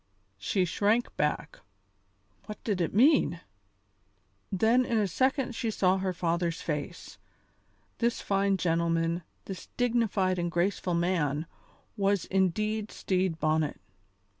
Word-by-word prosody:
She 185 - +1
shrank 210 +7 +1
back. 150 - -1 0.9
"What 210 - -8
did 200 -5 -1
it 165 - 0
mean?" 235 - +4 1.1
Then 225 +6 +3
in 235 -2 0
a 210 -2 +2
second 260 - 0
she 230 0 -2
saw 190 -3 +2
her 190 0 -1
father's 170 -1 -1
face. 150 +3 -5 0.8
This 235 0 +1
fine 195 0 +1
gentleman, 165 0 0 0.2
this 190 -2 -7
dignified 220 -7 +1
and 175 0 -1
graceful 175 +1 0
man, 165 -4 0 0.5
was 200 -2 +1
indeed 210 +3 0
Stede 185 -3 -1
Bonnet. 155 -1 0
185 Hz, 115 wpm, -29 LUFS, 170-215 Hz, 1.1 s, mean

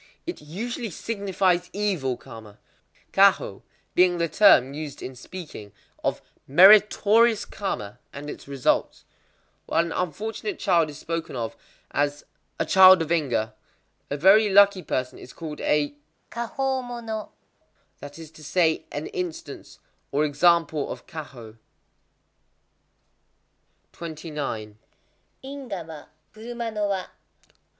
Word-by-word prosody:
It 345 - -6
usually 225 - -5
signifies 190 -2 -1
evil 185 -12 -1
karma; 110 -5 -13 0.6
kwahō - - +3 0.3
being 180 -1 +4
the 170 0 0
term 140 -9 +5
used 150 -1 -7
in 130 - -6
speaking 130 - -10 0.3
of - - -1 0.2
meritorious 210 - +6
karma 110 - -5
and 145 +1 -8
its 150 - -8
results. 140 -2 0 0.6
While 165 +1 +2
an 170 - -6
unfortunate 220 - -3
child 170 -5 +2
is 145 - -9
spoken 165 -3 -5
of 115 -2 -4 0.4
as 145 0 -1 0.3
"a - - +1
child 185 -2 +7
of 160 - -8
ingwa," 125 -10 0 0.6
a 145 - -2
very 200 +7 +6
lucky 200 -1 +6
person 130 -5 -3
is 125 - -12
called 155 -3 -7
a 150 -1 +1 0.4
"kwahō 260 +3 -2
mono,"—that 220 -10 -10
is 160 -2 -11
to 155 - -15
say, 160 +1 +1
an 145 +2 -4
instance, 160 -5 -6 0.3
or 145 +2 +2
example 155 0 +2
of - - -8
kwahō. 120 -8 -10 2.4
29.—_Ingwa 160 - -8
wa, 155 -2 -10 0.3
kuruma 235 +1 -6
no 210 -1 -1
wa. 190 -2 -2
170 Hz, 115 wpm, -25 LUFS, 145-205 Hz, 2.4 s, child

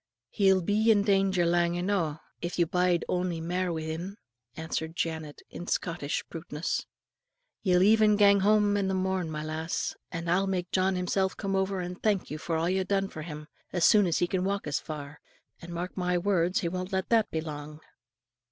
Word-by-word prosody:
"He'll 190 -2 +3
be 215 +5 +2
in 205 -2 +5
danger 195 -3 +2
lang 170 0 +2
eno', 175 -5 0 0.2
if 175 +1 -4
you 170 - +4
bide 180 0 +1
ony 180 -2 -1
mair 180 +2 -1
wi' 160 -1 -3
him," 170 +6 -5 0.4
answered 160 0 -4
Janet, 160 -3 -4
with 175 - -6
Scottish 165 -4 -2
bluntness. 160 -1 -4 0.7
"Ye'll 180 -2 +3
even 215 0 +5
gang 200 -1 +6
home 205 +1 +3
the 195 -2 0
morn, 185 -2 -1
my 150 -1 -4
lass, 160 +1 -3 0.2
and 170 -1 -4
I'll 185 +3 +2
make 180 -2 -2
John 190 0 +2
himsel' 190 +1 +1
come 195 -2 -2
over 190 0 0
and 180 +1 -6
thank 205 -7 0
you 155 - -4
for 165 +1 -2
a' 160 +1 +1
you've 185 +1 0
done 195 0 +1
for 155 - -8
him, 150 -1 -7 0.3
as 175 -2 +2
soon 205 -3 +6
as 165 - +1
he - - +2
can 180 +1 -1
walk 200 +1 -1
as 150 -3 -1
far; 150 -1 -8 0.4
and 170 - -9
mark 175 +2 -4
my 180 -1 0
words, 180 -1 +1
he 170 - -1
won't 185 +2 -4
let 190 0 -1
that 225 -2 +3
be 160 - -2
lang." 150 -1 -7
180 Hz, 195 wpm, -28 LUFS, 165-195 Hz, 0.7 s, gang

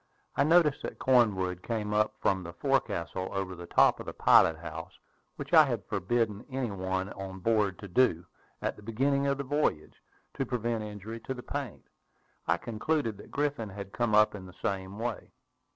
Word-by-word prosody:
I - - +3
noticed 155 -2 +4
that - - -6
Cornwood 100 -8 +2
came 105 -2 -2
up 105 0 +2
from 95 -1 +1
the 85 -1 -8
forecastle 100 - -1
over 95 -1 -3
the 85 -1 -9
top - - +4
of - - -8
the - - -4
pilot 80 - +5
house, 80 +1 -8 0.4
which - - -7
I - - +10
had - - -3
forbidden 110 +1 -1
any 130 -4 -2
one 95 0 -2
on 95 -1 -7
board 105 -1 +1
to 100 - -9
do, 90 -4 +2 0.4
at - - -1
the - - -14
beginning 135 +6 +1
of 140 0 +1
the 140 - -3
voyage, 145 - 0 0.4
to 135 - -1
prevent 120 -3 -2
injury 105 +2 -7
to 130 +4 -5
the 125 - -8
paint. 140 -7 -5 0.6
I - - +3
concluded 115 +1 -1
that - - -12
Griffin 140 -7 -1
had 100 0 -8
come 120 -3 +1
up 105 0 +5
in 95 -3 -8
the 90 - -14
same 95 0 -3
way. 115 0 -4
105 Hz, 185 wpm, -30 LUFS, 95-125 Hz, 0.6 s, I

